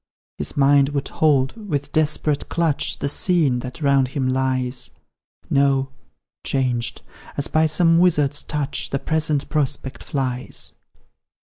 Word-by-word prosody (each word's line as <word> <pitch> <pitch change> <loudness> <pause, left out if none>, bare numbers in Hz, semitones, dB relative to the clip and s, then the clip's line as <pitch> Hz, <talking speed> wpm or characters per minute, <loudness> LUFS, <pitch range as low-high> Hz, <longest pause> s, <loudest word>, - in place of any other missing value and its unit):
His - - -4
mind 140 0 +5
would 140 -1 -3
hold 140 -4 +2
with 145 -2 -2
desperate 155 -1 0
clutch 165 -4 +1
The - - -2
scene 150 -4 +2
that 125 +5 -7
round 140 -2 +3
him 130 0 -2
lies; 130 -1 -1 0.6
No 135 -1 +2 0.5
changed, 125 -4 -1 0.3
as 140 - 0
by 155 0 +2
some 165 +1 +3
wizard's 150 -5 +2
touch, 150 -1 -2
The 140 - -1
present 155 -1 -1
prospect 140 -3 -2
flies. 130 -3 -3
140 Hz, 125 wpm, -22 LUFS, 130-150 Hz, 0.6 s, mind